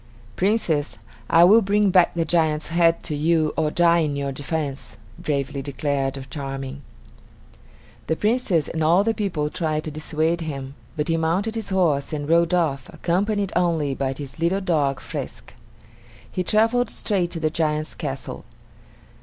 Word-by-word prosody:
"Princess, 180 -7 0 0.3
I 165 +1 +6
will 210 +6 +7
bring 205 0 +2
back 180 -2 +4
the 165 -1 0
giant's 155 -2 +1
head 170 0 +3
to 155 - -2
you 155 0 +2
or 155 -1 +1
die 170 +1 +4
in 150 -3 0
your 140 -1 -2
defense," 140 -1 -4 0.2
bravely 140 -1 -2
declared 135 -1 -2
Charming. 135 -1 -5 1.3
The 160 - +1
Princess 210 - +1
and 160 -1 -2
all 170 +5 +4
the 225 +1 +1
people 170 -9 -2
tried 155 -3 -1
to 155 - -5
dissuade 155 +2 -1
him, 135 -4 -5 0.2
but 150 - -1
he 165 - +2
mounted 175 +7 0
his 225 -3 -4
horse 165 -7 +1
and 145 -1 -3
rode 170 +1 +3
off, 140 -7 0
accompanied 200 +3 -1
only 165 -5 +1
by 135 0 -2
his 140 +2 -9
little 170 +4 +1
dog, 150 -8 0
Frisk. - - -7 0.8
He 185 - -1
traveled 225 +5 +2
straight 190 -5 -1
to 165 - -5
the 155 -1 0
giant's 155 -1 -1
castle. 135 -5 -5
160 Hz, 155 wpm, -23 LUFS, 145-180 Hz, 1.3 s, will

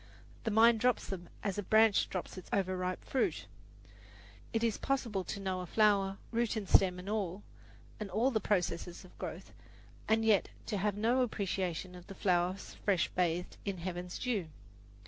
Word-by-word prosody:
The - - +2
mind 225 +1 +6
drops 250 +2 +2
them 175 -3 -6
as 200 -1 -1
a - - +1
branch 220 +1 +4
drops 185 - -4
its 185 - -10
overripe 185 -1 -1
fruit. 265 - 0 1.1
It 225 -1 0
is 230 -2 +1
possible 235 -8 -1
to - - -4
know 190 -2 -2
a 180 - -6
flower, 200 -1 +3
root 235 0 0
and 210 -3 -3
stem 180 -1 +5
and 180 +1 -8
all, 205 -2 -2 0.6
and 210 -2 -4
all 240 +7 +2
the 220 - +1
processes 175 -3 -1
of 185 - -17
growth, - - -6 0.5
and 225 0 +3
yet 215 -3 +4 0.2
to 210 - -2
have 205 +1 0
no 235 +5 +3
appreciation 185 -6 -2
of 180 -1 -12
the 195 - -9
flower 180 -1 +2
fresh 195 -1 -1
bathed 175 0 -1
in 200 -2 -3
heaven's 175 0 -5
dew. 220 -9 -1
195 Hz, 170 wpm, -33 LUFS, 180-220 Hz, 1.1 s, mind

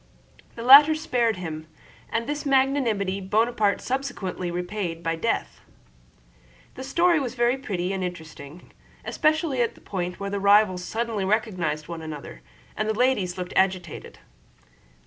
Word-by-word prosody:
The 230 - -7
latter 290 +5 +9
spared 245 -8 0
him, 160 -3 -6 0.4
and 230 0 -1
this 295 +3 -3
magnanimity 260 -8 +1
Bonaparte 215 +1 +1
subsequently 205 -9 -3
repaid 175 -1 -4
by 165 0 -1
death. 165 - -2 1.1
The 260 - -8
story 335 +5 +2
was 255 -3 -4
very 240 +1 +2
pretty 190 -8 -3
and 190 -1 -3
interesting, 160 -2 -8 0.3
especially 310 -4 +1
at 235 - -1
the - - -17
point 180 -2 -4
where 200 0 -4
the 200 - -2
rivals 200 -2 +4
suddenly 225 0 -2
recognized 185 -7 -1
one 165 -1 -6
another; 155 -3 -8 0.3
and 215 +1 -2
the 220 - 0
ladies 220 -8 +1
looked 180 -1 -5
agitated. 185 -4 -1
205 Hz, 140 wpm, -25 LUFS, 180-250 Hz, 1.1 s, latter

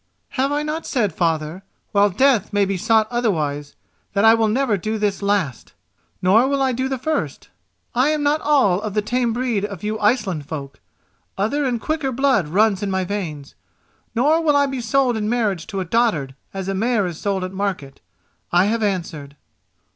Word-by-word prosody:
"Have 270 +1 0
I 295 +1 0
not 305 +2 -4
said, 220 -8 0
father, 165 0 -1 0.3
while 205 0 +4
death 240 +2 +2
may 205 -1 +2
be 195 0 -1
sought 220 +3 +2
otherwise, 155 -12 -1 0.4
that 200 +2 +2
I 225 - +8
will 225 -1 +2
never 235 0 +1
do 215 +4 -3
this 205 -2 -1
last? 200 -10 -1 0.5
Nor 215 +8 +5
will 280 0 0
I 265 -1 +2
do 260 +2 -2
the 265 - -1
first. 310 +5 -3 0.4
I 255 +3 +3
am 305 -1 0
not 295 +2 +2
all 260 -11 +3
of 210 -1 -5
the 210 - +1
tame 240 +2 0
breed 235 -3 -1
of 200 -3 -5
you 215 +1 -2
Iceland 195 - 0
folk—other 155 - -5
and 245 -3 0
quicker 310 0 -2
blood 260 - +2
runs 200 +4 +2
in 205 - -2
my 190 -1 0
veins; 170 -8 -5 0.6
nor 300 +8 +3
will 300 -3 +3
I 285 0 +4
be 270 -2 -3
sold 245 +1 +2
in 215 -1 -1
marriage 210 -8 0
to 195 -1 -3
a - - -3
dotard 175 - +1 0.2
as 195 -1 -5
a 195 - -1
mare 220 +1 +1
is 175 -3 -5
sold 195 -2 -1
at 185 - -4
a - - -11
market. 185 -9 -3 0.5
I 175 +2 +4
have 225 +2 0
answered." 165 -8 -3
210 Hz, 190 wpm, -21 LUFS, 185-250 Hz, 0.6 s, I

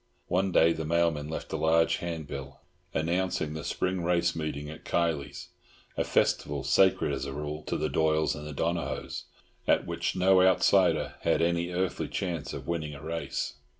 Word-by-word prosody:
One 95 +2 +1
day 85 -1 +5
the 80 -1 -4
mailman 80 -2 +1
left 80 - -5
a - - 0
large 80 +1 +3
handbill, 70 -5 -6 0.3
anouncing 85 -1 -1
the 80 0 -5
Spring 90 +4 -1
race 85 0 +2
meeting 75 -2 -3
at 75 +1 -9
Kiley's, 70 -4 -1 0.5
a - - +1
festival 70 -2 +1
sacred, 95 -3 +3
as 65 0 -3
a 70 - -5
rule, 75 +1 -4
to - - -1
the - - 0
Doyles 80 -1 +2
and 75 0 -7
the - - -6
Donohoes, 85 +4 -2 0.4
at - - +3
which - - -2
no 95 0 +5
outsider 95 -1 +3
had 80 - +2
any 85 0 +1
earthly 90 0 -1
chance 85 -6 -3
of - - -6
winning 80 -3 -2
a 70 - -10
race. 80 -4 -3
80 Hz, 170 wpm, -29 LUFS, 75-85 Hz, 0.5 s, day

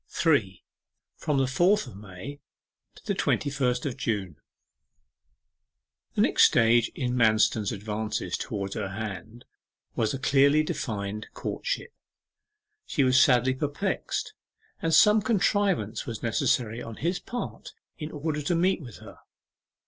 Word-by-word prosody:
3. 110 - +1 0.5
FROM 150 -2 -1
THE 135 - +3
FOURTH 180 +11 +2
OF - - -11
MAY 100 +8 -9 0.6
TO - - -17
THE - - 0
TWENTY 145 - 0
FIRST 125 -3 0
OF 135 -4 -3
JUNE 100 - -2 1.8
The - - +2
next - - +5
stage 115 0 +4
in 125 -2 -2
Manston's 110 -2 +3
advances 105 +1 -3
towards 100 -1 -4
her 105 -3 -3
hand 110 +3 -7 0.5
was 115 +4 0
a - - -3
clearly 140 +3 +4
defined 105 -7 -4
courtship. - - -4 0.9
She 145 - +1
was 130 0 +5
sadly 125 0 +4
perplexed, 150 - -3 0.5
and 165 - 0
some 210 +6 +6
contrivance 200 - 0
was 115 -3 -6
necessary 115 0 0
on 115 - -7
his 175 - -1
part 245 - -6 0.3
in 150 -1 -5
order 150 0 -3
to 160 +4 0
meet 180 +1 +2
with 120 -7 -10
her. - - -13
125 Hz, 135 wpm, -27 LUFS, 110-150 Hz, 1.8 s, some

